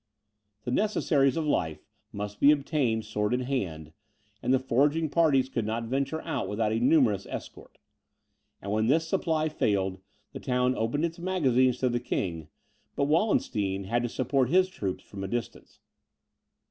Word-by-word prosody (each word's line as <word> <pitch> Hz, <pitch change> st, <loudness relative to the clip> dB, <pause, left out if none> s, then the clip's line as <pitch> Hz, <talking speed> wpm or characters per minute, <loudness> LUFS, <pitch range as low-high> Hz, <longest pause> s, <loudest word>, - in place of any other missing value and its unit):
The 125 Hz, -, -3 dB
necessaries 150 Hz, -6 st, +2 dB
of 160 Hz, -, -1 dB
life 80 Hz, -, -1 dB, 0.3 s
must 105 Hz, 0 st, -6 dB
be 140 Hz, -, +6 dB
obtained 140 Hz, -6 st, +1 dB
sword 105 Hz, +1 st, -1 dB
in 125 Hz, -, -1 dB
hand; 85 Hz, -, -3 dB, 0.5 s
and -, -, 0 dB
the 130 Hz, -, +5 dB
foraging 145 Hz, +5 st, +1 dB
parties 145 Hz, -5 st, +3 dB
could 120 Hz, -3 st, -2 dB
not 110 Hz, +2 st, -2 dB
venture 135 Hz, +6 st, -2 dB
out 165 Hz, -, -3 dB
without 105 Hz, +1 st, 0 dB
a 110 Hz, -, 0 dB
numerous 125 Hz, -7 st, +3 dB
escort. -, -, -9 dB, 0.9 s
And 100 Hz, -, -4 dB
when 110 Hz, +1 st, +1 dB
this 160 Hz, +5 st, +2 dB
supply 160 Hz, -1 st, 0 dB
failed, 95 Hz, -10 st, 0 dB, 0.3 s
the -, -, -6 dB
town 125 Hz, 0 st, +1 dB
opened 120 Hz, +8 st, 0 dB
its 170 Hz, 0 st, -5 dB
magazines 130 Hz, -9 st, +2 dB
to 130 Hz, -, +2 dB
the 120 Hz, 0 st, 0 dB
King, 85 Hz, -9 st, -3 dB, 0.5 s
but -, -, 0 dB
Wallenstein 125 Hz, -, +1 dB
had 115 Hz, +5 st, 0 dB
to 120 Hz, -, -2 dB
support 130 Hz, +1 st, 0 dB
his 185 Hz, +3 st, +4 dB
troops 100 Hz, -, -4 dB
from 100 Hz, -1 st, -8 dB
a -, -, -3 dB
distance. 120 Hz, +3 st, -6 dB
125 Hz, 160 wpm, -28 LUFS, 105-150 Hz, 0.9 s, be